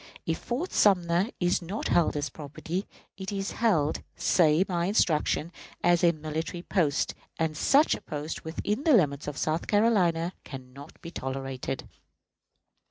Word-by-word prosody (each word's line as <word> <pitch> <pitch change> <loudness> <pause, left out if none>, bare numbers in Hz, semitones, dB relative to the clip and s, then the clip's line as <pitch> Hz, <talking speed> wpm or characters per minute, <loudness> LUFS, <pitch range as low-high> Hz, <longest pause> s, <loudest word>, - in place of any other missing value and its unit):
If 165 - -1
Fort 280 +10 -3
Sumter 180 0 +3
is 175 0 +1
not 185 +5 -4
held 165 -3 +3
as 145 0 -2
property, 160 +5 -5 0.3
it 190 +1 -5
is 195 -1 -3
held," 170 -11 +1
say 165 +1 +3
my 175 -2 0
instructions, 165 -4 +1 0.3
"as 175 0 +4
a 170 - +6
military 160 +2 -5
post, 155 -8 +1 0.2
and 160 -1 -1
such 280 - +4
a - - -4
post 150 -1 -5
within 205 - -2
the 315 - +4
limits 150 - +2
of 150 - -4
South 155 +2 -1
Carolina 185 -6 +2
can 130 -2 -10
not 140 +3 -12
be 170 - -8
tolerated." 135 -2 -4
170 Hz, 150 wpm, -28 LUFS, 150-190 Hz, 0.3 s, a